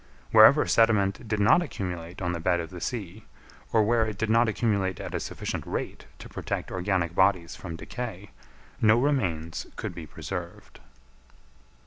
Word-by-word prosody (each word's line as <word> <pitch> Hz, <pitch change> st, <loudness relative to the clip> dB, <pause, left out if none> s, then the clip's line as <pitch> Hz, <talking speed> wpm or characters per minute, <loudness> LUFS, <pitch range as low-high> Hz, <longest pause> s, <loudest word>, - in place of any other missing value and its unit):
Wherever 110 Hz, +8 st, +8 dB
sediment 110 Hz, -2 st, +2 dB
did 110 Hz, 0 st, -1 dB
not 110 Hz, +12 st, +5 dB
accumulate 90 Hz, -, -5 dB
on 90 Hz, -, 0 dB
the 85 Hz, -, -3 dB
bed 85 Hz, +1 st, +1 dB
of 85 Hz, +1 st, -6 dB
the 90 Hz, -2 st, -8 dB
sea, 105 Hz, -3 st, -5 dB, 0.5 s
or 110 Hz, -2 st, +4 dB
where 115 Hz, +1 st, +2 dB
it 105 Hz, -2 st, -5 dB
did 110 Hz, +1 st, -1 dB
not 115 Hz, 0 st, +4 dB
accumulate 100 Hz, -4 st, 0 dB
at -, -, -6 dB
a -, -, -1 dB
sufficient -, -, -4 dB
rate -, -, -5 dB
to -, -, -10 dB
protect -, -, -4 dB
organic 90 Hz, -2 st, -1 dB
bodies 95 Hz, -2 st, +2 dB
from 85 Hz, -3 st, -7 dB
decay, 105 Hz, +1 st, -7 dB, 0.5 s
no 110 Hz, +1 st, +5 dB
remains 90 Hz, -, -1 dB
could -, -, -5 dB
be -, -, -8 dB
preserved. 90 Hz, -3 st, -7 dB
100 Hz, 160 wpm, -27 LUFS, 90-110 Hz, 0.5 s, Wherever